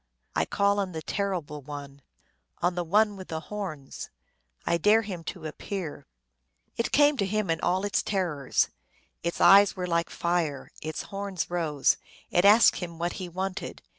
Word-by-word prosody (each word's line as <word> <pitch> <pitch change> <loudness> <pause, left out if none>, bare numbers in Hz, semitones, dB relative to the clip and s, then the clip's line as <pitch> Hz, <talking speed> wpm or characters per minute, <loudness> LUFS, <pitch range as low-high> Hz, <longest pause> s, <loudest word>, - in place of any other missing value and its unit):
1 80 0 +1
call 200 0 +2
on 190 -3 -2
the 160 - -4
Terrible 175 -6 -2
One! 140 0 -8 0.6
On 175 +1 +1
the 175 0 -2
One 205 +5 +3
with 190 -1 -9
the 160 - -3
Horns! 165 -7 -6 0.6
I 170 - +2
dare 215 +5 +5
him 185 -5 -6
to 175 -5 -6
appear! 165 +1 -5 0.7
It 230 - -1
came 290 0 +5
to 200 - +1
him 210 -3 0
in 165 - -1
all 185 +2 +1
its 205 - +1
terrors. 170 -9 0 0.5
Its 170 0 -3
eyes 200 +2 +7
were 180 - -3
like 170 -1 0
fire; 170 -5 -1
its 155 0 -4
horns 195 -3 -4
rose. 155 -5 +2 0.3
It 175 +2 +3
asked 215 +3 +7
him 170 -2 -6
what 170 +1 -1
he 180 - -5
wanted. 190 +2 -4
180 Hz, 165 wpm, -27 LUFS, 160-200 Hz, 0.7 s, eyes